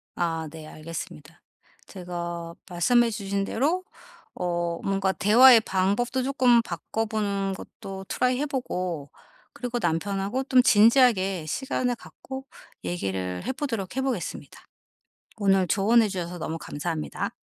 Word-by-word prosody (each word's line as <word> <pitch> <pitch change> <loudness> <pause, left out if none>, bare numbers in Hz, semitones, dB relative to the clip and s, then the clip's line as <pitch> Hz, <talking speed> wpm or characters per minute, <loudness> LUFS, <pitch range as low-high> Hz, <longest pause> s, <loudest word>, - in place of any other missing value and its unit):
아 165 -2 -1
네 160 -1 -10
알겠습니다. 160 0 -8 0.5
제가 175 -2 -6 0.2
말씀해 230 +7 +3
주신 200 -2 -2
대로 310 - 0 0.5
어 175 -1 -2
뭔가 195 -1 +1
대화의 230 +4 +7
방법도 210 +7 0
쪼끔 255 -3 +4
바꿔 220 +4 -3
보는 200 -3 -1
것도 190 0 -9
트라이 250 +5 +1
해 295 - 0
보고 180 - -3 0.4
그리고 245 -1 -3
남편하고 200 +8 -1
좀 260 -1 +5
진지하게 210 - +4
시간을 250 - -1
갖고 265 +3 -9 0.4
얘기를 95 - -3
해 - - 0
보도록 235 -8 -4
해보겠습니다. 260 -8 -3 0.8
오늘 195 -2 +3
조언해 215 +5 +4
주셔서 180 -2 -4
너무 165 0 -4
감사합니다. 155 +1 -4
195 Hz, 290 characters per minute, -26 LUFS, 175-240 Hz, 0.8 s, 대화의